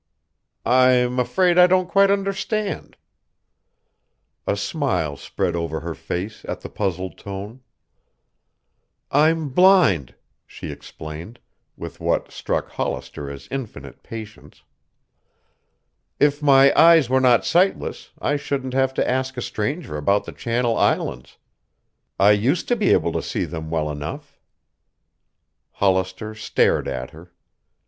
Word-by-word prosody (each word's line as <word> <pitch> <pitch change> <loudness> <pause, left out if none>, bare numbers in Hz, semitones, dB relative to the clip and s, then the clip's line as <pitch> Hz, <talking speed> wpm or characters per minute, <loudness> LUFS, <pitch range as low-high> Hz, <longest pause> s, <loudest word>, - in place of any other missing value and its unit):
"I'm 125 0 +3
afraid 180 +7 +2
I 180 - +8
don't 185 0 +2
quite 195 +1 +4
understand." 200 +1 -2 1.5
A 100 - +1
smile 100 - -1
spread 85 +4 -3
over 85 -2 -3
her 85 0 -4
face 90 +7 -5
at - - -5
the - - -8
puzzled 95 -4 -3
tone. 100 +5 -8 1.5
"I'm 155 +1 +3
blind," 170 - +4 0.3
she - - -8
explained, 80 +9 -9 0.4
with - - -8
what - - -1
struck - - -3
Hollister 70 -1 -4
as 70 -1 -9
infinite 105 - -7
patience. 110 -1 -10 1.6
"If 145 0 +2
my 140 -1 +6
eyes 165 -4 +6
were 130 +1 +2
not 125 -2 +4
sightless, 185 +3 0
I 145 - 0
shouldn't 135 -2 -3
have 135 0 +1
to - - 0
ask 130 +1 -1
a - - -2
stranger 130 - -3
about 100 +7 +1
the - - -7
Channel 120 0 -1
Islands. 60 - -1 0.8
I 100 +2 +6
used 120 - +1
to 245 - +3
be 215 -4 +1
able - - +3
to - - -2
see - - -3
them 80 -2 -6
well 80 -2 -1
enough." 75 +1 -7 1.3
Hollister 95 +2 0
stared 110 - +1
at 65 0 -4
her. 85 +2 -15
120 Hz, 125 wpm, -22 LUFS, 90-145 Hz, 1.6 s, I